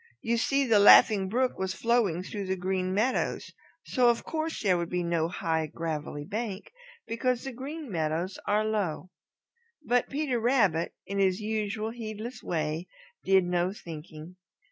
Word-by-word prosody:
You 235 +1 +1
see, 275 +4 +2
the 225 -4 +4
Laughing 200 -1 +7
Brook 255 +4 0
was 190 0 -2
flowing 225 -7 +1
through 200 0 -5
the 190 - 0
Green 185 0 -1
Meadows, 220 +7 0 0.3
so 250 -2 +3
of 235 - +1
course 320 -2 -3
there 190 -3 +4
would 170 -1 -2
be 180 0 -1
no 170 -1 0
high, 160 -2 -1
gravelly 150 -2 -4
bank, 210 +1 -5 0.3
because 245 +2 -1
the 270 - -4
Green 285 +5 -7
Meadows 165 +2 -2
are 210 +1 +2
low. 190 -5 -2 0.7
But 245 0 +2
Peter 275 -4 -1
Rabbit, 220 -9 +2
in 200 0 -3
his 190 -1 +2
usual 215 0 -2
heedless 225 +1 -7
way, 160 +1 -2 0.4
did 190 -1 +4
no 175 +1 0
thinking. 160 -1 -10
200 Hz, 155 wpm, -28 LUFS, 175-235 Hz, 0.7 s, Laughing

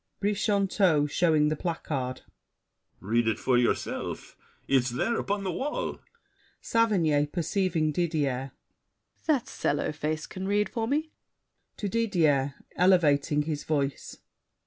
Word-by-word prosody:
BRICHANTEAU 200 -6 +2
(showing 155 -3 +3
the 155 - 0
placard). 140 -6 -3 0.8
Read 115 +3 +1
it 110 - +1
for 130 - +1
yourself. 120 -1 -1 0.3
It's 130 -2 +3
there, 175 - 0
Upon 200 0 -2
the 190 - -1
wall. 280 - -3 0.6
SAVERNY 170 -11 +2
(perceiving 170 -1 0
Didier). 145 -6 -1 0.8
That 285 -7 +2
sallow 145 - -1
face 155 +1 -3
can 190 +1 -6
read 205 +1 +1
For 225 -1 -2
me. 305 +4 -1 0.7
[To 205 - -3
Didier, 165 -11 +1 0.2
elevating 150 -5 +3
his 150 -1 -3
voice. 140 -3 -2
160 Hz, 115 wpm, -28 LUFS, 145-200 Hz, 0.8 s, showing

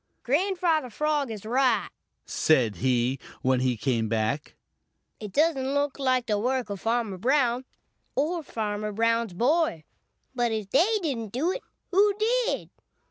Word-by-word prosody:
"Grandfather 330 -1 +1
Frog 295 +2 0
is 215 -2 -7
right," 250 +1 +2 0.4
said 125 - +2
he, 125 +4 +1 0.2
when 130 0 +3
he 125 -2 +1
came 115 -2 0
back. 115 +7 -1 0.6
"It 210 -2 -7
doesn't 280 - +1
look 285 -1 0
like 255 -2 +1
the 210 -3 0
work 250 -1 -1
of 200 - -5
Farmer 225 -4 -1
Brown 250 +1 +2 0.5
or 325 +6 0
Farmer 215 -6 -3
Brown's 230 -2 +1
boy. 255 - +1 0.5
But 240 -2 0
if 215 -3 -3
they 390 +11 +4
didn't 230 -9 -3
do 305 +9 +1
it, - - -4 0.3
who 400 +2 +4
did? 480 +3 0
240 Hz, 140 wpm, -27 LUFS, 200-295 Hz, 0.6 s, they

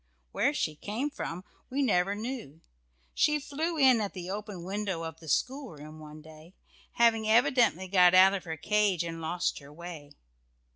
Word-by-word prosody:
Where - - +1
she 155 - -2
came 225 - -4
from 180 -9 -6 0.3
we 280 +2 0
never 195 -4 +2
knew 215 - -6 0.5
she 300 0 +2
flew 315 +4 -3
in 260 -5 +5
at 205 - -3
the 180 -1 -6
open 205 -3 -6
window 190 -2 -3
of 160 0 -7
the 160 - -10
schoolroom 155 - -3
one 155 0 -11
day, 160 +3 -15 0.4
having 225 -2 +3
evidently 235 - +3
got 180 -1 +5
out 190 +1 +7
of 195 - -3
her 160 -1 -5
cage 205 0 +1
and 165 -1 -6
lost 175 +2 -2
her 140 0 -14
way. 155 -3 -10
190 Hz, 165 wpm, -29 LUFS, 165-230 Hz, 0.5 s, out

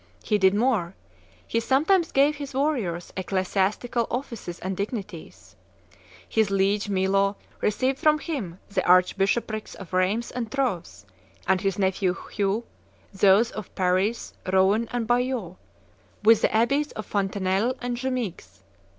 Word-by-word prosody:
He 210 -2 +1
did 190 0 +4
more: 210 -6 +1 0.5
he 230 - 0
sometimes 310 +9 +2
gave 285 +2 +3
his 280 -2 -7
warriors 240 - -1
ecclesiastical 195 +5 -1
offices 235 -8 -5
and 190 +1 -4
dignities. 200 -4 -6 0.7
His 220 -2 +1
liege 200 +1 +1
Milo 195 +1 +2 0.3
received 255 +6 0
from 305 0 +4
him 260 - -5
the 200 - -1
archbishoprics 195 +4 +2
of 190 -3 -11
Rheims 195 +6 +1
and 235 -3 -4
Troves; 175 - -2 0.4
and 190 0 +2
his 195 -1 -1
nephew 190 -1 +1 0.2
Hugh 205 +3 0 0.5
those 200 +4 +4
of 215 -3 -8
Paris, 185 +5 0 0.2
Rouen, 195 +5 +3
and 245 -2 -1
Bayeux, 240 -6 -1 0.7
with 225 +1 +6
the - - +2
abbeys 275 +7 +2
of 215 - -6
Fontenelle 195 +4 0
and 245 0 -3
Jumieges. 230 - -4
205 Hz, 130 wpm, -25 LUFS, 190-245 Hz, 0.7 s, with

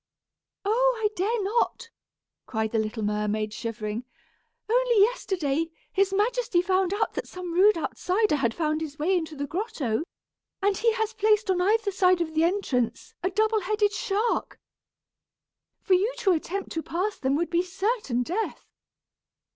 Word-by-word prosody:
"Oh! - - +3
I 435 -1 +1
dare 420 +4 0
not," 460 +2 -1 0.6
cried 220 -1 -1
the 225 - +1
little 220 +1 -2
mermaid, 210 0 -1
shivering. 225 0 -4 0.6
"Only 480 0 +3
yesterday, 330 - +1 0.2
his 390 0 +2
majesty 435 -1 +1
found 375 0 +1
out 435 +2 0
that - - -4
some 360 -2 -6
rude 390 +3 +5
outsider 365 +2 0
had 235 -5 0
found 310 -1 0
his 295 -2 -5
way 340 +5 +1
into 320 -3 -2
the 285 0 -3
grotto, 300 - -2 0.6
and 400 0 +2
he 455 +3 +2
has 445 -1 -1
placed 430 -1 +2
on 360 -1 +1
either 415 +2 +2
side 370 -2 +3
of 325 -2 -2
the 315 +1 +2
entrance 330 - -1
a 370 - 0
double 435 +2 +1
headed 415 +2 +1
shark. 445 +1 -1 1.2
For 385 - +2
you 390 +6 +3
to 430 -6 +2
attempt 365 +3 -2
to 325 - -2
pass 375 +6 -2
them 265 +1 +1
would 335 +2 -1
be 345 0 +3
certain 375 - -1
death! 390 - -3
375 Hz, 155 wpm, -26 LUFS, 310-430 Hz, 1.2 s, rude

